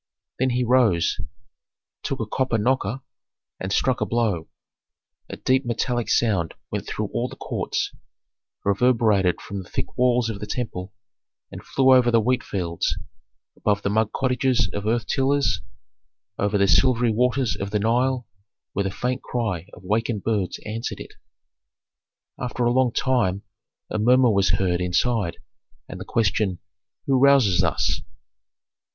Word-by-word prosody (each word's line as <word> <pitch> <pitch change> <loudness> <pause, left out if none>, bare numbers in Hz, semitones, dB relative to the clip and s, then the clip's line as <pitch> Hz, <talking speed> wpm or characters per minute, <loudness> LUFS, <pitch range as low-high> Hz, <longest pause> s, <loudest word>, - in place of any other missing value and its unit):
Then 130 +1 +2
he 125 0 0
rose, 115 -9 +3 0.8
took - - -3
a - - -1
copper 130 -3 0
knocker, 125 +1 0 0.6
and 95 - -4
struck 130 +5 +1
a - - +2
blow. 110 -9 0 0.8
A - - -6
deep 130 +1 +2
metallic 120 0 -1
sound 100 -8 +1 0.2
went - - -4
through - - -3
all - - -1
the - - -10
courts, - - -3 0.7
reverberated 100 -3 +3
from 100 -1 -6
the 90 - -14
thick - - -4
walls 125 -2 +3
of 110 -3 -4
the 105 - -6
temple, 100 -5 -4 0.6
and - - -9
flew 130 -1 +4
over 125 -2 +5
the 115 -1 +4
wheat 125 +3 +1
fields, 85 -4 -2 0.6
above 105 -1 0
the 100 - 0
mud 110 0 +1
cottages 125 -6 +1
of 105 +1 -3
earth 115 0 +1
tillers, 135 -6 +1 0.8
over 105 0 +1
the 100 0 +3
silvery 120 - +4
waters 125 -1 +1
of 100 - -4
the 105 - 0
Nile, 120 +4 +1 0.5
where 100 - -1
the - - 0
faint 125 +6 -2
cry 105 -8 -3
of 90 - -14
wakened 105 +1 -1
birds 105 -5 -1
answered 115 +3 -4
it. - - -10 1.3
After 125 0 -2
a 120 - +3
long 130 -1 +3
time 105 -8 0 0.5
a - - -1
murmur 125 +2 +5
was 100 -4 +2
heard 90 -2 +1
inside, 95 +1 0 0.5
and - - -8
the - - -7
question, 105 -3 0 0.5
"Who 135 -2 +2
rouses 135 -9 +5
us?" - - 0
115 Hz, 150 wpm, -23 LUFS, 100-125 Hz, 1.3 s, over